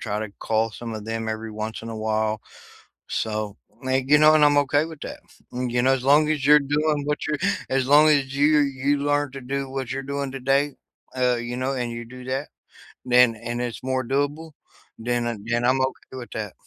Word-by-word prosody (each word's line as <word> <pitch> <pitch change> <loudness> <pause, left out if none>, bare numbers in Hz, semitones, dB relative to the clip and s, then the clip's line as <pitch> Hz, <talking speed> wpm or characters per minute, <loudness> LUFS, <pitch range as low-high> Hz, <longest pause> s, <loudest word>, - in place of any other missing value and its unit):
try 105 -1 -3
to 110 - -5
call 110 0 0
some 115 +1 -6
of 110 -1 -6
them 115 0 -3
every 110 0 -4
once 110 +1 -5
in 115 - -7
a 110 - -6
while. 110 0 -1 0.7
So, 110 -2 -3 0.3
may 130 0 0
you 150 +2 +6
know, 155 +1 +7
and 155 -1 +6
I'm 145 0 +5
okay 145 +1 +2
with 160 -3 -10
that. - - -7 0.3
You 125 -1 -1
know, 135 +1 +4
as 130 -1 -4
long 150 +2 +5
as 150 -3 -1
you're 150 +1 +8
doing 150 +1 0
what 150 0 -2
you're 150 -2 -1 0.3
as 130 -1 +1
long 150 +2 +7
as 140 -3 +2
you're 145 +1 +4
you 140 +1 0
learn 145 0 0
to 135 - -7
do 135 +1 -3
what 130 -2 -4
you're 135 - -3
doing 140 -1 -3
today, 135 +2 +1 0.4
uh, 125 -1 +2
you 120 +1 -4
know, 130 +2 -1
and 120 -2 -3
you 120 0 -6
do 125 +1 -11
that, 135 +3 -3 0.6
then 125 -2 +5
and 120 +2 -5
it's 120 -1 -5
more 130 -1 -1
doable, 145 +5 -1 0.5
then 120 +1 -1
I 120 - -3
then 120 +1 -1
I'm 130 +2 +3
okay 130 0 -3
with 120 -2 -8
that. 105 -3 -7
130 Hz, 215 wpm, -24 LUFS, 120-145 Hz, 0.7 s, you're